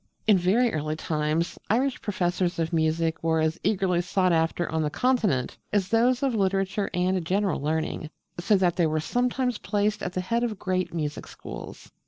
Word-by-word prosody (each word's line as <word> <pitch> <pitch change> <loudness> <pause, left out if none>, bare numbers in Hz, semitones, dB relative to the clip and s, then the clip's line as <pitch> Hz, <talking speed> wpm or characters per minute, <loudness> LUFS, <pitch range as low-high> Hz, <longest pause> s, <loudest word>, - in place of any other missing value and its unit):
In 215 - +6
very 205 +7 +2
early 155 0 -2
times 155 +1 -1
Irish 255 +4 +1
professors 180 -2 -1
of 165 +1 -1
music 160 0 +1
were 160 -1 +2
as 160 +2 0
eagerly 185 -4 +1
sought 185 +1 +1
after 165 +1 +1
on 160 0 -1
the 150 - 0
Continent 210 - 0
as 195 -3 +1
those 245 +4 +3
of 270 -3 +1
literature 195 -1 0
and 180 0 0
general 190 0 0
learning, 155 +1 -2 0.3
so 200 +4 +3
that 180 -2 +1
they 170 -3 +3
were 155 0 0
sometimes 250 +5 0
placed 205 0 0
at 180 - -3
the 185 - -1
head 230 +6 0
of 225 -4 -2
great 185 -1 -1
music 150 -3 -4
schools. - - -9
185 Hz, 180 wpm, -26 LUFS, 160-210 Hz, 0.3 s, In